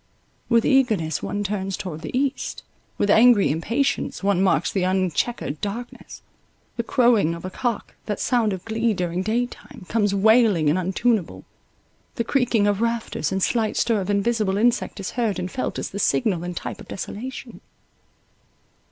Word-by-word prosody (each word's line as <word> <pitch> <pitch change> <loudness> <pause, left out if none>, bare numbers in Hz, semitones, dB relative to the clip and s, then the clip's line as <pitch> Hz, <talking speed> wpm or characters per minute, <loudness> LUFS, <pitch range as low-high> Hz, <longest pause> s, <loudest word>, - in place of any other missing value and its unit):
With 230 -2 +3
eagerness 215 - +2
one 205 0 -3
turns 195 -1 -3
toward 160 -4 -6
the 170 +9 -3
east, 275 0 -2 0.3
with 205 - +2
angry 220 - +6
impatience 230 - -1
one 195 -2 +2
marks 190 - +2
the 195 - -1
unchequered 185 -2 -1
darkness; 230 +4 -6 0.5
the 235 - -1
crowing 230 -8 +3
of 170 - -9
a 185 - -5
cock, 240 +1 -3
that 210 -2 -2
sound 235 -4 +1
of 190 -2 -5
glee 225 0 0
during 180 0 -2
day 225 +5 0
time, 225 -5 -13
comes 205 -2 +1
wailing 205 -7 +4
and 175 - +1
untuneable—the 215 - -3
creaking 240 -4 +1
of 205 0 +1
rafters, 230 -3 -1
and 190 0 0
slight 225 -3 0
stir 225 -4 +2
of 185 - -5
invisible 205 -1 +1
insect 235 0 +1
is 195 - -4
heard 230 -5 -1
and 180 0 -4
felt 255 - -3
as - - -4
the 200 - -5
signal 205 -6 +1
and 175 -1 -5
type - - -6
of - - -13
desolation. 235 +6 -7
205 Hz, 160 wpm, -23 LUFS, 190-235 Hz, 0.5 s, angry